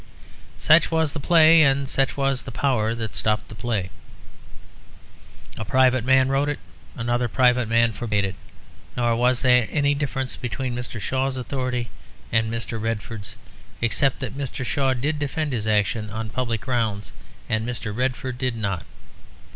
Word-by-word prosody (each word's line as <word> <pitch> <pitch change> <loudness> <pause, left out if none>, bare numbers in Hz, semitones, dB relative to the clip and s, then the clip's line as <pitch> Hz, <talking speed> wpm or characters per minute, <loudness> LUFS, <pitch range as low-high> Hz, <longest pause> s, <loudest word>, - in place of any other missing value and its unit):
Such 155 +2 +5
was 160 -2 +1
the 155 - -4
play; 160 +2 +6
and 140 -2 +3
such 135 +1 0
was 135 -2 +1
the 135 - -8
power 115 -3 0
that 110 -2 -5
stopped 105 -1 -1
the - - -9
play. 105 -4 -2 1.7
A - - -2
private 130 +2 +3
man 130 +1 +4
wrote 135 +2 +1
it; 145 - -2 0.4
another 120 +1 0
private 125 0 +3
man 115 0 +3
forbade 105 -3 -1
it; 95 - -3 0.6
nor 120 -1 +2
was 125 +2 +2
there 125 -3 +4
any 145 -1 +2
difference 135 -3 -2
between 125 +1 -3
Mr. 120 -1 -5
Shaw's 130 +5 -1
authority 125 -2 -3 0.4
and 110 -1 +1
Mr. 115 -1 -4
Redford's, 110 -2 -4 0.4
except 125 +4 +1
that 130 -1 -4
Mr. 135 -2 -4
Shaw 135 0 +1
did 145 +4 -1
defend 150 0 -2
his 110 -3 -2
action 105 +1 +1
on 110 0 -5
public 115 -3 -2
grounds 105 -4 -2 0.4
and 110 0 0
Mr. 115 -3 -4
Redford 125 0 -2
did 130 -2 0
not. 100 -6 -3
125 Hz, 155 wpm, -23 LUFS, 115-135 Hz, 1.7 s, play